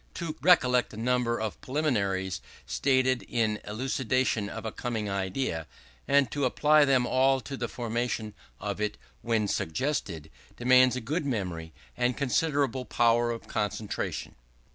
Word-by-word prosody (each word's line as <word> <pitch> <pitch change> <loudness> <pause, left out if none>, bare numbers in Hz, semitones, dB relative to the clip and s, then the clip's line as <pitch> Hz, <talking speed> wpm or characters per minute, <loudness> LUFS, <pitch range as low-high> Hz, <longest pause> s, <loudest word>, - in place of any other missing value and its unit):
To 165 -3 -4
recollect 125 -8 +4
a - - -10
number 120 0 +1
of 110 -1 -4
preliminaries 100 - -1 0.2
stated 130 -2 +2
in 110 -3 0
elucidation 125 -1 -1
of 115 +1 -7
a 110 - -2
coming 115 -4 -3
idea, 95 - -2 0.4
and 140 -2 +3
to 145 -2 0
apply 150 +3 +4
them 130 -3 +3
all 130 +1 +3
to 140 - -6
the 120 -2 -3
formation 115 -2 -3 0.3
of 105 0 -4
it 105 0 -1 0.2
when 115 -3 +1
suggested, 80 - -2 0.3
demands 125 +1 +5
a 130 - -3
good 145 +6 -2
memory 90 -9 -3 0.2
and 125 - 0
considerable 140 -2 +1
power 120 0 +3
of 115 -1 -5
concentration. 105 0 -3
120 Hz, 140 wpm, -28 LUFS, 105-130 Hz, 0.4 s, demands